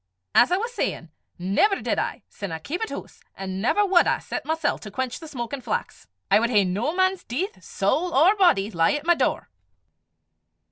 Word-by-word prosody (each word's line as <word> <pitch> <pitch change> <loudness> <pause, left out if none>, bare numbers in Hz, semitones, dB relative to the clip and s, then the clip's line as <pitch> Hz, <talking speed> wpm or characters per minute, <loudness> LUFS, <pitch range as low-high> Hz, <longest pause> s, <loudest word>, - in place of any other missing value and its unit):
as 245 - +5
I 365 - +3
was 470 +4 -3
sayin', 170 - -3 0.3
never 200 - +2
did - - -1
I, - - -3
sin 200 -4 -7
I 160 - -3
keepit 345 - -4
hoose, - - -8
an' 190 0 -5
never 410 - +3
wad 370 -3 +4
I - - +2
set - - -6
mysel' 320 -1 0
to 210 - -9
quench 255 +4 -3
the 325 - -10
smokin' 260 -1 -5
flax; 470 - -4 0.2
I - - +7
wad 235 +1 +1
hae 210 -4 +4
no 210 - -1
man's 375 0 +1
deith, 370 - -4
sowl 355 +2 0
or 335 +8 +5
body, 230 - +3
lie 165 - +2
at 295 +1 -3
my 345 - +5
door." - - -1
290 Hz, 195 wpm, -24 LUFS, -, 0.3 s, I